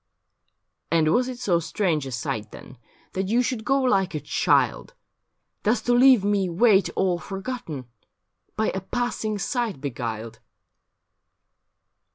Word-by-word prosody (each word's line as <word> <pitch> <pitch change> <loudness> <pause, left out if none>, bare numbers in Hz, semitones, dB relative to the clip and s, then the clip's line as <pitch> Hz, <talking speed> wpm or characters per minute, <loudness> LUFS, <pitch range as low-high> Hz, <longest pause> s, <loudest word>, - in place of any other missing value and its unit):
' - - -47 0.3
And 160 -1 +3
was 250 +1 +2
it 255 -1 -5
so 195 -9 +1
strange 165 -4 -1
a - - -6
sight, 110 -3 -3
then. 125 - -13 0.3
That 190 0 -2
you 235 +5 +2
should 240 -3 -2
go 275 +3 +2
like 195 -9 +1
a - - -1
child, - - +1 0.7
Thus 220 +3 +2
to 245 - +2
leave 250 -3 +6
me 200 -2 +1
wait 195 +2 +4
all 180 -2 +1
forgotten. 195 - -6 0.7
By 220 - +1
a 190 - -4
passing 220 0 -2
sight 225 - -2
beguiled 115 -5 -5
195 Hz, 140 wpm, -24 LUFS, 160-240 Hz, 0.7 s, leave